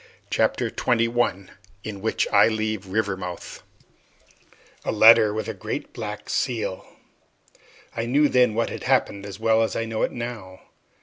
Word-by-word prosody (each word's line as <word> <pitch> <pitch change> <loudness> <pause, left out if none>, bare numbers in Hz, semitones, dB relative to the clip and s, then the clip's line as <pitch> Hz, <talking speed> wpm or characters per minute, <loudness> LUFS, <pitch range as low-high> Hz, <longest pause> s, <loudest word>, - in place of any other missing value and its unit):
Chapter - - +1
Twenty 115 -1 +1
One 115 -5 -1 0.3
In 100 -3 -7
Which 110 - 0
I - - +7
Leave 110 -3 -2
Rivermouth 95 -3 -4 1.2
A - - -1
letter 110 -1 +7
with 110 +1 -4
a - - -3
great - - -6
black 105 -2 -6
seal! 115 -7 -2 1.1
I 115 +1 -2
knew 145 +4 +3
then 125 -5 +3
what 115 - 0
had - - -7
happened 100 0 +1
as 100 0 -9
well 110 0 +3
as 115 - -1
I 115 - -1
know 110 -1 -3
it - - +1
now. 110 -6 -7
110 Hz, 150 wpm, -24 LUFS, 100-115 Hz, 1.2 s, I